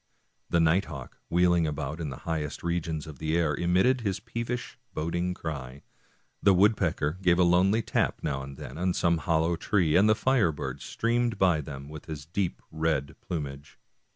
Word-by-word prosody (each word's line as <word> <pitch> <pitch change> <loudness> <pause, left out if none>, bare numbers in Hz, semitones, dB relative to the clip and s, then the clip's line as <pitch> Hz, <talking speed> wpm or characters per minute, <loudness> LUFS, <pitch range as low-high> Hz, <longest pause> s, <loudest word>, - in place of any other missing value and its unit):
The 85 - +3
night 85 +4 +3
hawk, 70 -5 -9
wheeling 85 -1 +3
about 75 +2 -4
in 75 - -3
the 70 - -6
highest 80 -3 -3
regions 85 -3 -2
of 75 -4 -10
the 80 +1 0
air, 80 -3 +2
emitted 90 - +2
his 100 -4 -1
peevish, 115 +2 -5 0.2
boding 85 +3 -1
cry. 70 -5 -6 0.6
The 100 -1 +5
woodpecker 90 -5 +2
gave 90 -2 +4
a 90 - +5
lonely 95 +6 +4
tap - - 0
now 70 -1 -1
and 70 0 -8
then 80 - -8
on 90 0 +1
some 85 -1 +2
hollow 80 0 +1
tree, 85 -3 +1
and 100 +4 +6
the 110 - +5
firebird 110 - +1
^ - - -16
streamed 120 -1 0
by 90 -5 +3
them 70 -1 -8
with 75 0 -9
his 75 -3 -7
deep 90 +2 -2
red 80 -2 -1
plumage. 70 -4 -6
85 Hz, 180 wpm, -28 LUFS, 75-95 Hz, 0.6 s, and